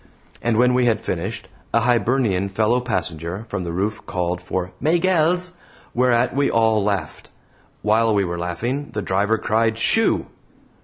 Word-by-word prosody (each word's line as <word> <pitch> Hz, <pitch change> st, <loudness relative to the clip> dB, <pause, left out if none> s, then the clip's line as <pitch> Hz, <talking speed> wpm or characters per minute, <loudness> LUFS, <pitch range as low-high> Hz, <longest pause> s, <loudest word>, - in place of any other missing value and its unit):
And 120 Hz, -1 st, +1 dB
when 125 Hz, +1 st, +4 dB
we 125 Hz, 0 st, +3 dB
had 115 Hz, -3 st, +2 dB
finished, -, -, -4 dB, 0.3 s
a -, -, +4 dB
Hibernian 120 Hz, -5 st, +1 dB
fellow 110 Hz, +5 st, +1 dB
passenger 90 Hz, -4 st, -3 dB
from 100 Hz, -2 st, -3 dB
the 85 Hz, -, -4 dB
roof 100 Hz, +5 st, -2 dB
called 90 Hz, 0 st, -2 dB
for 95 Hz, 0 st, -3 dB
"Maygells!" 175 Hz, +2 st, +2 dB, 0.4 s
whereat 125 Hz, 0 st, +2 dB
we 140 Hz, 0 st, +2 dB
all 110 Hz, -2 st, +2 dB
laughed. 100 Hz, -7 st, -3 dB, 0.5 s
While 110 Hz, +2 st, +3 dB
we 100 Hz, -, +3 dB
were 85 Hz, 0 st, -4 dB
laughing, 115 Hz, +12 st, -3 dB
the 105 Hz, -, -3 dB
driver 100 Hz, +4 st, +1 dB
cried 110 Hz, +1 st, +1 dB
"Shoo!" 225 Hz, -, +2 dB
110 Hz, 150 wpm, -21 LUFS, 95-125 Hz, 0.5 s, when